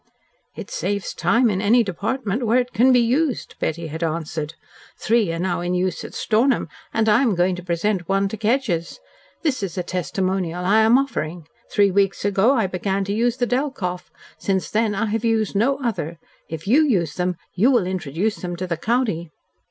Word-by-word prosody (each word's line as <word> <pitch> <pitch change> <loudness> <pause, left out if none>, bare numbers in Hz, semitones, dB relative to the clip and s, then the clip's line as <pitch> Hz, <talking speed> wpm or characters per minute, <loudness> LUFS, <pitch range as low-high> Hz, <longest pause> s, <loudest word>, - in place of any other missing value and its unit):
"It - - -8
saves 205 - -2
time 235 +2 +2
in 195 -3 0
any 230 +4 +4
department 220 +4 -2
where 230 +3 +4
it 250 0 0
can 250 +4 +5
be 250 - +5
used," 255 +3 0
Betty 165 +1 -2
had 160 +1 -6
answered. 160 -1 -3 0.4
"Three 225 -6 +2
are 165 - -3
now 175 0 -1
in 175 +1 -1
use 180 -1 -1
at - - -9
Stornham, 235 - +1 0.2
and 225 0 +1
I 215 +3 +5
am 235 -8 +2
going 180 +1 +2
to 180 - -8
present 175 +1 -1
one 195 0 +2
to 220 - -4
Kedgers. 220 -6 -1 0.5
This 285 -8 0
is 190 -2 -4
a 180 - -1
testimonial 180 -1 -2
I 210 +4 +4
am 220 +3 +6
offering. 175 - -3 0.2
Three 200 -1 +4
weeks 195 -1 +1
ago 205 +6 +3
I 225 -5 +2
began 190 +1 -1
to 200 +1 -2
use 235 +3 +1
the 245 - +1
Delkoff. 240 -9 -2 0.3
Since 190 -2 -1
then 215 -1 +1
I 220 +3 0
have 220 +1 -2
used 225 -3 +1
no 255 +7 +2
other. 170 -9 -2 0.3
If 160 0 -6
YOU 275 +9 +5
use 180 - +1
them 180 +2 -1 0.2
you 225 +8 +3
will 240 -8 +3
introduce 185 +3 -2
them 175 -1 -5
to 180 +2 -4
the 170 -2 -2
county." 210 -5 0
200 Hz, 195 wpm, -22 LUFS, 180-235 Hz, 0.5 s, am